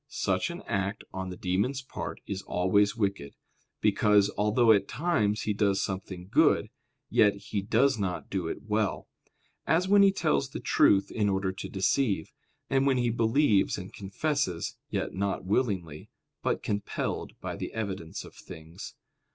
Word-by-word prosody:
Such - - -1
an - - -7
act 100 +2 -2
on 95 0 -4
the 90 - -7
demon's 110 +10 -1
part - - -6
is 100 -1 -4
always 100 +3 +2
wicked; 100 -9 -2 0.5
because, 105 -1 +4
although 110 +3 +4
at 100 -2 +3
times 115 -8 0
he 105 - 0
does 100 -1 +1
something 95 -1 -5
good, - - +3 0.4
yet 105 -1 +4
he 100 0 -4
does 115 +5 +2
not 95 -3 -3
do 95 -4 -2
it - - -5
well; 105 -1 -1 0.6
as 165 +5 +2
when 200 +1 +6
he 200 -1 +6
tells 70 - 0
the - - -6
truth 100 0 +3
in 105 -2 +1
order 95 -1 0
to 95 - -7
deceive; 95 -2 0 0.4
and 135 0 +2
when 135 -2 +3
he 120 -1 +1
believes 115 -2 +2
and 90 0 -8
confesses, 100 - -2
yet - - -2
not 100 -1 -2
willingly, 95 - -1 0.3
but - - -1
compelled 105 -1 -3
by - - -5
the - - -5
evidence 95 -7 -4
of - - -13
things. 80 +4 -10
100 Hz, 160 wpm, -28 LUFS, 95-115 Hz, 0.6 s, when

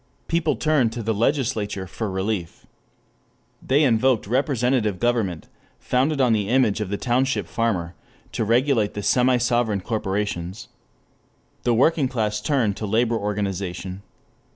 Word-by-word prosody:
People 165 -2 +1
turned 150 -7 +2
to 115 -1 -5
the 110 +1 0
legislature 110 -5 -1
for 105 +4 -4
relief. 95 -2 -3 1.0
They 140 +4 +2
invoked 125 -2 +2
representative 125 - +1
government, 110 -8 0 0.3
founded 140 +4 0
on 125 -3 +4
the 105 -2 0
image 120 -5 +2
of 105 - -3
the 100 - -2
township 130 +4 0
farmer, 95 -7 -1 0.4
to - - -1
regulate 115 -1 +2
the 105 - -4
semi 125 +2 +3
sovereign 120 -4 +1
corporations. 100 -3 -3 0.9
The 120 -1 +1
working 140 +3 +3
class 105 -4 -2
turned 115 -5 0
to 105 - -4
labor 115 +3 +1
organization. 100 -3 -3
115 Hz, 130 wpm, -23 LUFS, 100-125 Hz, 1.0 s, on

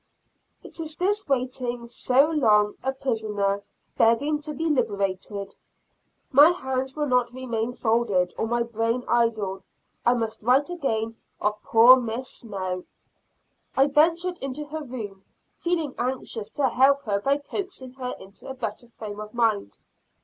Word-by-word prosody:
It - - -9
is 315 -1 -3
this 410 +4 0
waiting 250 -2 -1
so 255 +3 +3
long 210 -8 +4
a 265 - 0
prisoner, 215 -6 -1 0.4
begging 235 +7 +3
to 300 +1 -5
be 320 +3 -2
liberated. 200 - -1 0.8
My 290 +4 +8
hands 265 -6 -2
will 300 -1 0
not 250 -3 +1
remain 245 -2 -3
folded 220 -7 +1
or 225 - -1
my 240 +1 +1
brain 230 +1 -1
idle. 220 -5 +1 0.4
I 240 - +4
must 225 -2 -2
write 260 +8 +3
again 225 -9 -2 0.2
of 210 +1 -1
poor 235 +3 +7
Miss 245 +1 -3
Snow. 185 -5 -4 0.9
I 270 - +6
ventured 330 +5 +2
into 275 +2 -4
her 315 +1 -4
room, 215 -7 -7 0.3
feeling 330 -5 -2
anxious 245 -4 -3
to 270 +3 +1
help 275 +3 +4
her 205 -5 0
by 275 +5 +2
coaxing 290 -4 -6
her 255 -1 -5
into 195 +6 -12
a 265 - -5
better 240 -1 -5
frame 215 -3 -8
of 215 +2 -8
mind. 220 - +1
245 Hz, 145 wpm, -25 LUFS, 220-275 Hz, 0.9 s, My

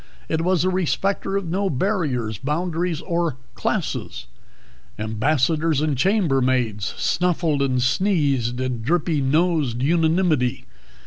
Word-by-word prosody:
It 160 - -1
was 180 -1 +2
a 185 - +2
respecter 195 +2 0
of 200 - -3
no 195 +4 0
barriers, 130 - -1
boundaries, 165 +3 -2
or 170 -6 -1 0.2
classes; - - -3 0.7
ambassadors 145 +8 +1
and 150 -1 0
chambermaids 130 - +1
snuffled 165 -4 +1
and 130 -2 +1
sneezed 130 - +1
in 125 -3 -2
drippy 155 +3 0
nosed 145 -3 +1
unanimity. 160 -4 +1
155 Hz, 110 wpm, -22 LUFS, 130-175 Hz, 0.7 s, was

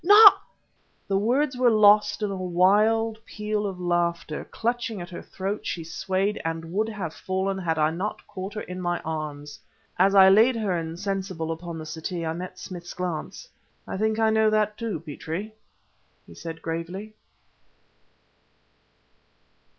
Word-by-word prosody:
not 410 +3 +9 0.3
..." - - -41
The 195 -1 +1
words 260 +6 +1
were 250 -1 +4
lost 210 -1 +5
in 205 - 0
a - - -3
wild 210 +5 +2
peal 210 -1 -3
of 190 -2 -6
laughter. 170 -3 -1
Clutching 230 -2 -2
at 175 +1 -8
her 170 - -7
throat 195 +2 -4
she 165 - -3
swayed 190 +5 -1
and 165 +1 -4
would 215 +3 +1
have 190 -7 -5
fallen 190 +1 -2
had 165 -3 -1
I 155 0 +3
not 185 +6 -4
caught 190 +3 -7
her 210 - -3
in 180 0 -6
my 175 -1 -1
arms. 150 -2 -5 0.4
As 195 +2 +4
I 190 -1 +9
laid 220 +6 +6
her 210 -5 0
insensible 175 0 -3
upon 165 0 -6
the 155 - -7
settee 165 +2 -4
I 160 - -1
met 185 +2 -7
Smith's 180 -1 -8
glance. 180 - -4 0.4
"I - - -4
think 220 +2 0
I 220 -1 +3
know 220 0 +4
that, 215 -1 +1
too, 225 -7 -3
Petrie," 165 +7 -6 0.7
he - - -14
said 165 -1 -8
gravely. 175 +6 -5
190 Hz, 160 wpm, -25 LUFS, 170-215 Hz, 0.7 s, not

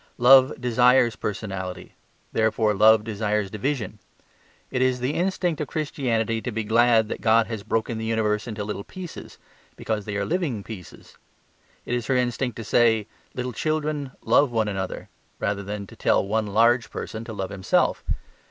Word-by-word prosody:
Love 130 +3 +6
desires 125 0 +4
personality; 95 -3 -5 0.4
therefore 110 -1 +2
love 110 +1 +5
desires 105 -2 -1
division. 110 -1 -3 0.7
It 130 - -1
is 130 -1 +2
the 125 +4 -1
instinct 175 -3 -1
of 150 - -2
Christianity 115 -7 -1
to 125 - -4
be 110 0 -2
glad 115 0 +4
that - - -5
God 115 0 +4
has 110 -2 -5
broken 110 +2 -2
the 110 - -4
universe 110 -1 0
into 105 -3 -4
little 100 -1 -5
pieces, 180 - -9 0.4
because 110 -2 -3
they 105 - -4
are 100 - -1
living 155 - -1
pieces. 95 -6 -11 0.7
It - - -3
is 120 -2 -2
her 135 - +2
instinct 125 0 0
to 115 - -6
say 110 -1 +3 0.3
"little 125 0 -3
children 150 +1 -2
love 125 +5 +4
one 115 -2 0
another" 95 -2 -4 0.3
rather 100 0 -1
than 100 +1 -5
to - - -14
tell - - +2
one 110 +1 0
large 115 +3 +3
person 110 0 -6
to 115 - -7
love 95 -2 -4
himself. 95 -2 +1
115 Hz, 165 wpm, -24 LUFS, 105-125 Hz, 0.7 s, Love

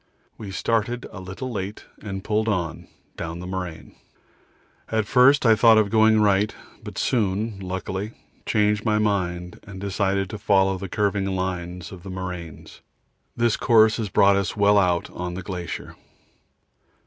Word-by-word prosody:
We 105 - -8
started 115 +4 -1
a 105 - -8
little 95 +8 -6
late 100 -1 -5 0.2
and 95 -2 -6
pulled 110 +1 0
on 85 -7 -2 0.3
down 85 0 -5
the 90 - -7
moraine. 90 -3 -6 1.0
At 110 -1 0
first 130 +4 +5
I 110 -1 +6
thought 115 0 +6
of 105 -2 +2
going 110 -1 +5
right, 100 0 +2 0.3
but - - -8
soon, 105 -2 0
luckily, 95 +3 -4 0.3
changed 105 0 +1
my 110 -2 +2
mind 90 -4 -1
and 100 -2 -10
decided 100 0 0
to 105 - -6
follow 95 -2 +2
the 95 0 -6
curving 100 -1 0
lines 90 -2 -3
of 95 -3 -10
the 95 - -9
moraines. 90 -4 -7 0.6
This 120 -1 +2
course 110 -2 +4
has 110 -3 -3
brought 100 +1 +4
us 100 +1 -2
well 100 0 +5
out 90 -3 +1
on 90 0 -5
the 95 - -6
glacier. 90 -3 -6
100 Hz, 155 wpm, -24 LUFS, 95-110 Hz, 1.0 s, I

